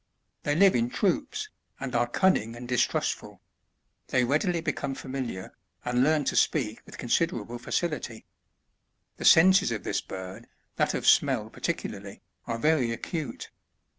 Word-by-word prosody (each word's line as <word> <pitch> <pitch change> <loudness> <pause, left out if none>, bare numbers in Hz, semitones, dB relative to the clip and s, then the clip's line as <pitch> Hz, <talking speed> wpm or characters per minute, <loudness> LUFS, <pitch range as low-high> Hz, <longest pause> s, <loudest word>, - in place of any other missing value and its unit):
They 145 - 0
live 195 +3 +6
in 120 0 +1
troops, 295 - -1 0.3
and 135 -2 -5
are 120 0 +2
cunning 120 - +1
and 120 +1 -8
distrustful; 125 -1 -1 0.7
they 125 - +2
readily 160 +7 +1
become 145 -4 -3
familiar, 130 -9 -5 0.3
and 125 +1 +2
learn 155 +1 +3
to - - 0
speak 115 -7 +1
with - - -11
considerable 120 -3 -1
&cility. 125 -5 -3 0.9
The - - -5
senses 185 -4 +6
of 110 -3 -3
this - - -1
bird, 95 +4 -8 0.3
that - - +1
of - - -3
smell - - +3
particularly, - - -5 0.2
are 115 - -2
very 140 -3 +2
acute. 155 +6 -5
130 Hz, 135 wpm, -27 LUFS, 120-160 Hz, 0.9 s, live